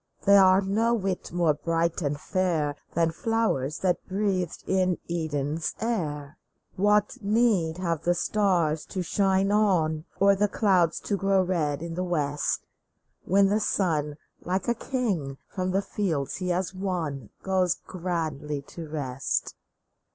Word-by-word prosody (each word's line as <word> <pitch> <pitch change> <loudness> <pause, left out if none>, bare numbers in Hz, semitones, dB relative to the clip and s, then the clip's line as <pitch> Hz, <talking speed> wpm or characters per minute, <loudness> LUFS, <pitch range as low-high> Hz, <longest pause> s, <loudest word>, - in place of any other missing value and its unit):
They 200 0 +7
are 190 -1 +6
no 220 +5 +1
whit 195 -4 -3
more 170 -3 +2
bright 165 +2 -1
and 145 -2 -1
fair 165 -6 0 0.2
Than 165 -1 +2
flowe; 225 +6 +1
rs 135 +4 -4
that 180 -2 +1
breathed 190 -3 -1
in 185 -2 +1
Eden's 155 -2 -2
air! 155 -9 -3 0.4
What 205 +1 +2
need 205 -6 +2
have 170 -4 -1
the 175 +1 +1
stars 175 -6 +1
to 185 - -3
shine 195 +2 +2
on? 170 -7 +2
Or 200 0 +5
the 205 +2 +2
clouds 185 -6 +2
to 205 - -1
grow 195 -1 +2
red 160 -5 -1
in 170 -1 -5
the 180 +2 -2
west, 150 -5 -1 0.6
When 195 +2 +4
the 210 +2 +2
sun, 155 -8 0 0.3
like 185 +2 -2
a 235 - +3
king, 210 - -2
from 185 -1 -3
the 195 +2 +1
fields 165 -12 -2
he 185 -1 -3
has 180 +1 -1
won, 170 - -3
Goes 185 -2 +2
grandly 155 -5 -4
to 165 -2 -8
rest 135 -4 -2
180 Hz, 145 wpm, -27 LUFS, 155-195 Hz, 0.6 s, They